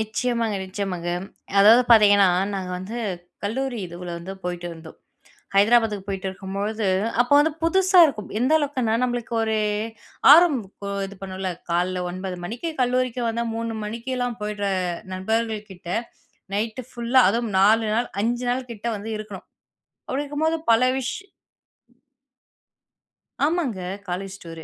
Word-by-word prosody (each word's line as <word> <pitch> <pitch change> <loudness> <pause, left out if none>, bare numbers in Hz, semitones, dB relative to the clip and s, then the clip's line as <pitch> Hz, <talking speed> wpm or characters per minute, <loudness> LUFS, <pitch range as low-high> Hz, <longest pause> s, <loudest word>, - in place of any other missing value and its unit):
நிச்சயமாங்க, 225 0 -1
நிச்சயமாங்க. 185 -3 -4 0.5
அதாவது 225 +5 +8
பார்த்தீங்கன்னா, 205 -3 +7 0.3
நாங்க 185 -2 -4
வந்து 215 +6 -6 0.5
கல்லூரி 250 +3 -2
இதுவுல 175 +1 -8
வந்து 175 +3 -7
போயிட்டுருந்தோம். 175 -2 -6 0.6
ஹைதராபாத்துக்கு 210 -1 +3
போயிட்டிருக்கும்பொழுது, 195 +2 -3 0.3
அப்போ 245 +3 +1
வந்து 310 +2 +3
புதுசா 370 +2 +4
இருக்கும். 230 -9 -4
எந்த 255 +5 +1
அளவுக்குன்னா, 270 -7 -1
நம்மளுக்கு 240 -2 -2
ஒரு 220 0 0 0.7
ஆர்வம் 320 -3 +7 0.5
இது 200 +1 -10
பண்ணும்ல. 190 -1 -4 0.2
காலைல 180 +1 0
9 185 0 -5
மணிக்கு 240 - -4
கல்லூரிக்கு 250 -1 0
வந்தா, 235 +1 -2
3 230 0 -3
மணிக்கெல்லாம் 245 +2 -3
போயிட்ற 210 -1 -2 0.4
நண்பர்கள் 220 +2 -2
கிட்ட 175 -2 -13 0.7
நைட்டு 220 +4 -2
ஃபுல்லா, 245 +2 +3
அதுவும் 230 +1 -1
4 220 +3 +5
நாள், 235 +2 0
5 240 +2 -1
நாள் 250 0 -3
கிட்ட 215 0 -9
வந்து 210 +2 -7
இருக்கணும். 210 -3 -9 0.6
அப்பிடி 275 +2 -1
இருக்கும்போது 315 +3 0
பல 225 +2 +5
விஷ் 260 -1 -2 2.3
ஆமாங்க. 295 - 0 0.3
College 190 +2 -4
tour. 165 -1 -9
220 Hz, 120 wpm, -23 LUFS, 195-245 Hz, 2.3 s, அதாவது